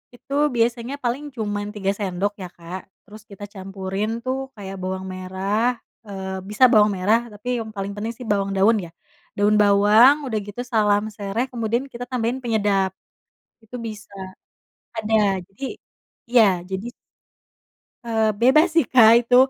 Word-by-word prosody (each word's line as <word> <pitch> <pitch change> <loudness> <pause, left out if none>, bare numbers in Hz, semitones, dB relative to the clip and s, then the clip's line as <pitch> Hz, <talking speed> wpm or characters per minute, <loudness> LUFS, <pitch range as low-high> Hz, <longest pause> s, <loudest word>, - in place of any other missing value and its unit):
itu 260 +3 -10 0.2
biasanya 235 +2 0
paling 245 +5 -1
cuman 205 -2 -3
3 195 -1 0
sendok 200 0 -1
ya, 180 - -5
Kak, 175 +2 -7 0.2
terus 215 0 -13
kita 200 0 -11
campurin 195 +1 -4 0.2
tuh 260 +1 -1 0.2
kayak 195 -2 -7
bawang 185 0 -4
merah, 190 +2 -3 0.5
eee, 190 -1 -5
bisa 215 +5 +1
bawang 210 -2 +5
merah 210 +5 +3
tapi 210 +4 -12
yang 220 - -7
paling 195 +1 -3
penting 220 +3 -4
sih 250 - -8
bawang 195 -1 0
daun 215 +3 +4
ya, - - -11 0.5
daun 205 +1 +3
bawang 210 +6 +6
udah 220 -5 -1
gitu 205 +4 -6
salam 210 -2 +3
sereh 205 +5 -2
kemudian 235 +2 -1
kita 245 +1 -6
tambahin 245 0 -1
penyedap. 205 -4 +1 0.7
Itu 225 +3 -9
bisa 210 -2 -9 0.9
ada 220 0 -1 0.4
jadi 195 +8 -21 0.7
iya 240 -3 +6 0.3
jadi 190 +4 -4 1.2
Eee, 220 -1 +1
bebas 305 +7 +6
sih, 330 -7 +4
Kak, 225 -3 +8
itu 245 +1 +1
210 Hz, 150 wpm, -22 LUFS, 195-235 Hz, 1.2 s, Kak